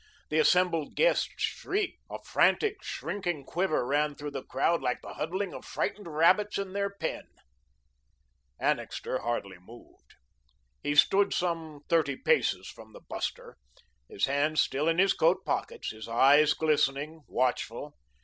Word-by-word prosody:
The 155 - +1
assembled 170 -2 +2
guests - - +3
shrieked, 400 -1 -2
a - - -5
frantic, 425 -2 +2
shrinking 175 -8 -4
quiver 175 -5 0
ran 145 +2 +1
through 145 0 -6
the 135 -2 -5
crowd 165 +5 0
like 125 -1 -1
the - - -8
huddling 185 +4 -3
of - - -8
frightened 205 -3 -3
rabbits 170 +7 +3
in 195 -1 -4
their 200 0 0
pen. 200 - -5 1.3
Annixter - - -1
hardly 100 -6 -3
moved. 95 - -17 0.7
He 145 0 -1
stood 200 +6 +4
some 165 -4 -2
thirty 155 -5 +2
paces - - +1
from - - -12
the - - -12
buster, - - -5 0.5
his 100 - 0
hands 145 +3 +1
still 145 +4 +1
in 165 0 +2
his 195 +2 +4
coat 165 +3 +2
pockets, - - -3
his 110 0 -9
eyes 145 +6 +5
glistening, 155 0 0
watchful. 125 +2 -2
155 Hz, 140 wpm, -29 LUFS, 140-180 Hz, 1.3 s, eyes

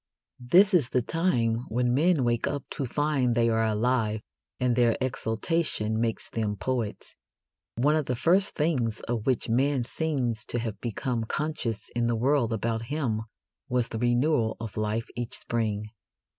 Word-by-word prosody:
This 185 +11 +5
is 150 -9 +4
the 125 - +1
time 125 -9 +1
when 120 +1 +1
men 155 +1 +3
wake 120 -1 +1
up 145 -1 -2
to 140 - -2
find 135 -2 +1
they 115 0 +3
are 110 0 +2
alive, 110 0 +1 0.4
and 125 -1 +2
their 120 -2 +3
exultation 110 -2 -1
makes 115 -1 -1
them 105 -2 -2
poets. 110 +1 -3 0.6
One 145 +6 +3
of 155 -3 0
the 125 - 0
first 185 - +3
things 130 -8 0
of 115 -2 -3
which 130 -2 +1
man 130 +3 +2
seems 125 -6 -1
to - - -2
have 110 -4 -4
become 120 0 -2
conscious 130 -5 -3
in 120 0 +1
the 120 - +1
world 125 0 +2
about 115 +1 -1
him 130 -8 -1 0.5
was 125 -1 +1
the 110 - -4
renewal 120 0 +2
of 115 -3 -6
life 110 +2 -1
each 120 -1 -3
spring. 105 -2 -2
120 Hz, 160 wpm, -27 LUFS, 115-140 Hz, 0.6 s, This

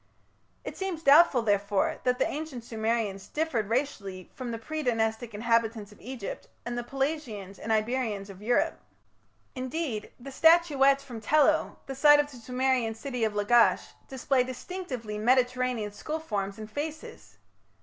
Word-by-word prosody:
It - - -6
seems 375 -4 -4
doubtful, 280 -4 +6
therefore, 205 -2 +1
that 250 0 +2
the - - +2
ancient 295 -5 -5
Sumerians 220 -3 -2
differed 275 -10 -1
racially 205 -8 -3
from 255 -2 -6
the 230 - -3
pre 310 +7 -5
Dynastic 225 -3 -1
inhabitants 225 -1 0
of 210 - -17
Egypt 245 -4 -7 0.2
and 240 0 -3
the 240 - -2
Pelasgians 250 -8 -3
and 225 - -4
Iberians 220 -2 0
of 190 0 -13
Europe. 240 +3 +1 0.7
Indeed, 255 -4 -3
the 275 +3 -9
statuettes 285 -3 +5
from 240 -5 -8
Tello, 305 +6 +3
the 270 - -5
site 295 +2 +6
of 295 0 0
the 255 - -11
Sumerian 250 -1 0
city 250 0 -4
of 220 -1 +1
Lagash, 230 +3 +3 0.2
display 265 -1 +1
distinctively 255 - -6
Mediterranean 250 -2 +1
skull 305 +10 -4
forms 200 -10 -3
and 215 -1 -7
faces. 305 +3 -7
245 Hz, 150 wpm, -28 LUFS, 220-275 Hz, 0.7 s, doubtful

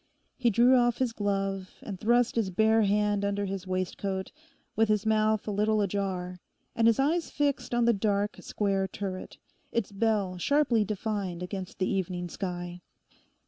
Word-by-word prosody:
He 245 -2 +2
drew 240 +4 +5
off 240 -1 +3
his 255 -3 0
glove 195 -2 -2
and 195 -4 -6
thrust 240 +3 +2
his 225 -5 +1
bare 220 +4 +3
hand 205 0 +2
under 200 0 0
his 195 -1 -5
waistcoat, 190 +1 -2 0.4
with 220 0 +3
his 210 0 +2
mouth 215 -1 +2
a - - -1
little 210 +1 +2
ajar, 185 -2 -2 0.4
and 230 0 +4
his 230 - +4
eyes 320 +5 +1
fixed 280 -4 -1
on 240 -1 +2
the 235 - +5
dark 205 0 0
square 195 -2 0
turret, 190 0 -6 0.3
its 230 -3 -1
bell 200 -3 0
sharply 270 - +3
defined 200 -3 -3
against 185 0 -6
the 185 - 0
evening 180 -2 -2
sky. 175 -1 -5
205 Hz, 160 wpm, -28 LUFS, 190-225 Hz, 0.4 s, drew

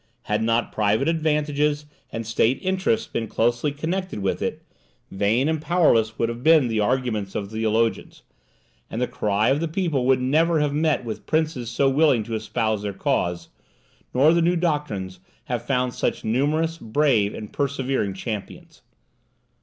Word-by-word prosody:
Had 105 +1 -1
not 115 +1 +1
private 110 +6 +1
advantages 150 -2 0 0.3
and 115 0 -4
state 115 +3 +2
interests 190 +4 0
been 115 - -4
closely 120 +7 0
connected 175 - -3
with 95 -2 -2
it, - - -3 0.5
vain 105 +8 +1
and 160 -1 0
powerless 120 -11 +2
would 115 - +1
have 115 +1 -5
been 155 -3 +5
the 110 -1 0
arguments 110 -3 -1
of 100 0 -4
theologians; 110 +1 -1 0.7
and 110 - -4
the 125 - +2
cry 105 +1 0
of 135 +2 +2
the 165 - -1
people 160 -7 -1
would 130 -1 +4
never 155 +6 +2
have 150 -1 0
met 150 -3 +1
with 110 -2 -6
princes 155 -7 0
so 135 +3 +1
willing 135 -4 +3
to 115 - -7
espouse 110 -1 -1
their 100 -1 -3
cause, 85 -2 -1 0.6
nor 145 +6 +4
the 170 - +3
new 175 +2 +2
doctrines 145 - -2 0.2
have 120 -2 -4
found 125 -2 0
such - - -2
numerous, 155 +8 0
brave, 115 -4 +1
and 105 - -8
persevering 135 -7 -1
champions. 105 +1 -7
125 Hz, 160 wpm, -23 LUFS, 110-150 Hz, 0.7 s, been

